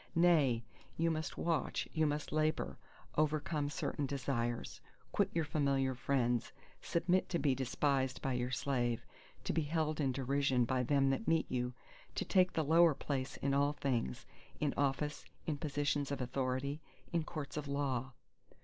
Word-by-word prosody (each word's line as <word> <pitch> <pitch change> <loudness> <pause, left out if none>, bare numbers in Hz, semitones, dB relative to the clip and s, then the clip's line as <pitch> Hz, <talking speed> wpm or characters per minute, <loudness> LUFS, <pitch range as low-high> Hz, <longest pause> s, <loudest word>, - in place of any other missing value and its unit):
Nay, 155 -9 +4 0.3
you 165 +1 +2
must 160 0 -3
watch, 165 -2 0
you 155 -1 +3
must 150 0 -2
labour; 155 - 0 0.4
overcome 155 -1 +1
certain 145 -1 -2
desires; 120 - -2 0.3
quit - - +2
your 165 -2 0
familiar 140 -3 +1
friends, 125 -2 0 0.3
submit 175 +2 +1
to 175 - +1
be 145 -5 +2
despised 130 0 0
by 135 - -1
your 125 0 -1
slave, 120 -3 0 0.4
to - - -1
be 165 - +2
held 155 0 0
in 135 -2 +2
derision 135 -1 +2
by 130 +1 +1
them 135 +2 +3
that 175 +11 -2
meet 165 -1 +3
you, 125 -1 -1 0.4
to - - -1
take 185 -2 +4
the 160 - +1
lower 165 0 +6
place 135 -2 -3
in 140 0 +2
all 140 +1 +3
things, 125 - -1 0.3
in 150 -2 +1
office, 145 +2 0 0.2
in 150 -3 -2
positions 145 -1 0
of 140 - -2
authority, 130 +3 -1 0.3
in 170 -2 +2
courts 155 -3 -6
of 150 -1 -3
law. 135 -2 -1
140 Hz, 160 wpm, -35 LUFS, 130-155 Hz, 0.4 s, lower